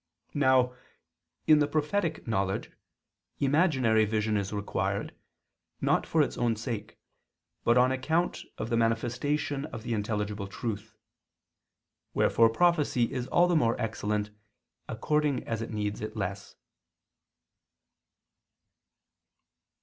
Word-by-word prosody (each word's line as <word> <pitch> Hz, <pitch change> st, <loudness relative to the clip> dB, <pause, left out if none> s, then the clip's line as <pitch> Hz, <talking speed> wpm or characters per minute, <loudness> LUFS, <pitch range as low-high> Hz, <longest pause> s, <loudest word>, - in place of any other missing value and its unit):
Now, 130 Hz, -3 st, +3 dB, 0.7 s
in 155 Hz, -1 st, +6 dB
the 145 Hz, -, +3 dB
prophetic 155 Hz, +2 st, -1 dB
knowledge, 95 Hz, -3 st, -1 dB, 0.7 s
imaginary 135 Hz, -7 st, +3 dB
vision 110 Hz, 0 st, 0 dB
is 100 Hz, -2 st, -1 dB
required, 100 Hz, -1 st, -2 dB, 0.7 s
not -, -, +1 dB
for -, -, +3 dB
its -, -, -4 dB
own 120 Hz, -2 st, +2 dB
sake, 110 Hz, -1 st, -5 dB, 0.7 s
but 120 Hz, +1 st, +4 dB
on 125 Hz, +1 st, +5 dB
account 160 Hz, +7 st, 0 dB, 0.2 s
of 115 Hz, -, -4 dB
the 115 Hz, -, +2 dB
manifestation 125 Hz, +5 st, 0 dB
of 115 Hz, -, -8 dB
the 120 Hz, 0 st, -2 dB
intelligible 105 Hz, -1 st, -2 dB
truth. 110 Hz, +1 st, -5 dB, 1.2 s
Wherefore 115 Hz, -1 st, +4 dB
prophecy 150 Hz, -4 st, +2 dB
is 125 Hz, -1 st, -3 dB
all 175 Hz, +1 st, +4 dB
the 175 Hz, -, +2 dB
more 120 Hz, -7 st, +2 dB
excellent 105 Hz, -1 st, -2 dB, 0.6 s
according 145 Hz, +4 st, 0 dB
as 115 Hz, -1 st, -3 dB
it 115 Hz, -, -4 dB
needs 105 Hz, -1 st, -3 dB
it 110 Hz, +1 st, -5 dB
less. 100 Hz, 0 st, -4 dB
115 Hz, 110 wpm, -29 LUFS, 105-145 Hz, 1.2 s, in